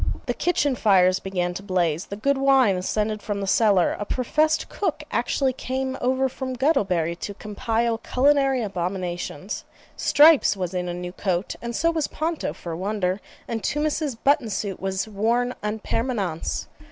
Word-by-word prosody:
The - - -1
kitchen 295 -5 +1
fires 190 -5 +4
began 180 -2 -2
to 180 - -6
blaze, 180 -4 0
the 200 - -5
good 280 +7 +1
wine 270 -7 +4
ascended 210 +3 -1
from 205 -1 -3
the 200 - -2
cellar, 195 -2 +3
a - - -1
professed 305 +8 +1
cook 410 - -2
actually 265 -2 +1
came 260 +1 -3
over 260 +1 +2
from 260 0 -5
Guttlebury 190 - +1
to 200 +3 -6
compile 225 +2 -1
culinary 270 0 +2
abominations. 180 -2 -4 0.3
Stripes 300 -7 +5
was 180 -1 -3
in 180 -1 -2
a - - -3
new 180 0 -5
coat, 185 0 -2
and 235 0 -4
so 335 +2 +2
was 320 -3 -1
Ponto, 320 +1 -2
for 170 - -8
a 165 - -4
wonder, 190 0 -1 0.3
and 230 -2 -3
Tummus's 295 - -1
button 275 0 +2
suit 200 -2 -3
was 190 +1 -2
worn 230 +4 0
EN 210 +1 -2
PERMANENCE. 215 -7 -2
215 Hz, 165 wpm, -24 LUFS, 185-265 Hz, 0.3 s, Stripes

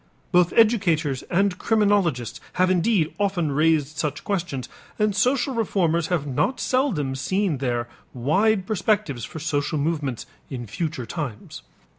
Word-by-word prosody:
Both 175 -1 +4
educators 170 - +3
and 190 0 +1
criminologists 200 - +1
have 185 0 +2
indeed 180 -2 +2
often 190 -7 0
raised 155 0 +1
such 150 -1 -2
questions, 175 -10 -2 0.3
and 210 -2 +1
social 250 +5 +2
reformers 175 -8 +1
have 175 -6 0
not 145 - 0
seldom 215 - 0
seen 165 +3 -1
there 120 -3 -1 0.2
wide 190 - +1
perspectives 190 - 0
for - - -9
social 150 0 -1
movements 145 -5 -2 0.2
in 125 -3 -5
future 130 - -4
times. 125 -4 -6
170 Hz, 130 wpm, -24 LUFS, 140-200 Hz, 0.3 s, Both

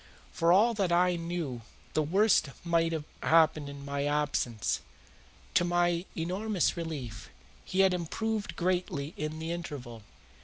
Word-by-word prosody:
For 165 +1 +2
all 215 +6 +5
that 195 -5 0
I 180 +1 +4
knew 165 -7 -3 0.3
the 155 - +2
worst 185 +1 +3
might 165 -1 +2
have 160 -2 -2 0.2
happened 155 -3 +4
in 140 0 -9
my 140 0 -2
absence. 145 -7 0 0.7
To - - +4
my 175 0 +1
enormous 185 +3 0
relief, 135 - -5 0.3
he 190 - +1
had 190 -1 +5
improved 210 +5 -2
greatly 175 -4 -1
in 155 +1 -4
the 160 +1 -4
interval. 140 -9 -6
165 Hz, 140 wpm, -30 LUFS, 145-180 Hz, 0.7 s, all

